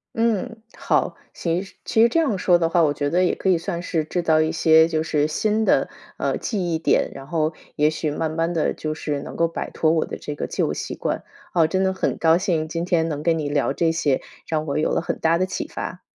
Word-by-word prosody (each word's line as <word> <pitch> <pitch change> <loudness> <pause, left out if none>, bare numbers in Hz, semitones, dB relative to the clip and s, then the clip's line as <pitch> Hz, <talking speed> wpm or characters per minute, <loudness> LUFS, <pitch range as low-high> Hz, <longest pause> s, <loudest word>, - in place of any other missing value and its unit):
嗯， 225 0 0 0.2
好， - - +1 0.2
行。 170 +1 -1
其 195 - -12
其 220 - +2
实 235 - +6
这 330 - +2
样 270 -12 +1
说 180 -1 +4
的 165 -1 +1
话， 170 +1 +3
我 145 - +3
觉 145 0 -1
得 180 +3 +2
也 - - +2
可 190 - -1
以 180 - +4
算 170 +1 -4
是 165 -3 -1
制 175 +3 -2
造 160 -2 +3
一 155 0 +1
些 160 0 +5
就 160 -1 -1
是 150 -2 +1
新 215 +7 0
的， - - +3 0.3
呃， - - -1
记 180 -7 -2
忆 160 - 0
点， 165 - +2
然 135 0 -10
后 155 0 0 0.2
也 150 0 +3
许 155 0 -2
慢 155 +2 -2
慢 165 +1 -1
地 160 -3 +1
就 155 0 -4
是 145 -3 -3
能 - - -8
够 165 - +2
摆 165 - -5
脱 155 - +1
我 160 -1 +1
的 - - -6
这 150 - -6
个 - - -4
旧 - - -1
习 - - -5
惯。 - - -3 0.3
哦， 165 -3 +4
真 190 +3 0
的 190 - +1
很 190 - -1
高 165 0 +4
兴 170 -5 0
今 165 +2 -3
天 165 -2 +1
能 150 -1 -3
跟 165 0 +2
你 145 -2 -2
聊 145 -1 +1
这 165 +3 +1
些， 155 -5 +1 0.3
让 155 -1 -1
我 140 - -2
有 155 - +1
了 - - +1
很 - - -3
大 165 +1 +3
的 185 - +1
启 - - -4
发。 - - -6
165 Hz, 275 characters per minute, -23 LUFS, 155-180 Hz, 0.3 s, 实